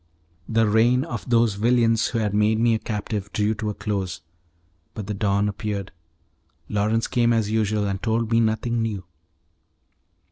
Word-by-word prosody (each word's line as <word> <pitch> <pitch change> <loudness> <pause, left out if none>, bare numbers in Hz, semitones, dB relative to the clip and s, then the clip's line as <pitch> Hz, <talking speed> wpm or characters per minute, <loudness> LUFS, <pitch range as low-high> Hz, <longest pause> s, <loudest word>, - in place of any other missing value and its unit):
The 115 -1 +3
reign 120 +4 +3
of 120 -6 -6
those 115 -3 +3
villains 115 +1 +2
who 120 - -3
had 105 -3 0
made 105 +1 +2
me 115 0 +3
a 110 - 0
captive 105 -2 -4
drew 105 +1 +1
to 105 0 -3
a 105 - -4
close; 95 -5 -3 0.7
but 105 - -5
the 105 - -3
dawn 100 0 +1
appeared, 100 -1 -4 0.8
Lawrence 110 +2 0
came 120 -1 +2
as 110 -2 +1
usual, 110 -1 +1
and 95 -1 -2
told 115 0 0
me 115 - +4
nothing 115 +1 0
new. 105 -4 -3
110 Hz, 165 wpm, -23 LUFS, 105-115 Hz, 0.8 s, me